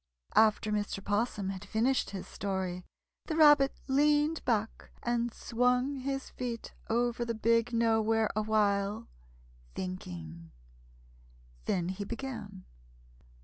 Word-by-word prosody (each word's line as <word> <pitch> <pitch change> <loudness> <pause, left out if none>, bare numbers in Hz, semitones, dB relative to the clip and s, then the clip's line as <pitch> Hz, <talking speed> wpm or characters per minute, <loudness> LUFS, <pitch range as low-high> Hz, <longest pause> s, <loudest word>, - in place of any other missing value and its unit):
After 215 0 +4
Mr. 205 -1 -1
'Possum 205 -1 0
had 190 0 -7
finished 230 +6 +1
his 195 -2 -6
story, 190 -2 -3 0.4
the 315 - -2
Rabbit 295 -3 +6
leaned 295 +3 +3
back 220 -3 -1
and 240 0 0
swung 250 +5 +1
his 270 +1 -4
feet 240 -2 -5 0.2
over 240 +1 +1
the 230 -1 -2
Big 230 +2 +2
Nowhere 225 -1 +2
awhile, 210 -1 +1 0.7
thinking. 85 - -6 1.2
Then 180 -2 0
he 190 +2 -4
began. 220 -4 -6
225 Hz, 105 wpm, -31 LUFS, 200-250 Hz, 1.2 s, Rabbit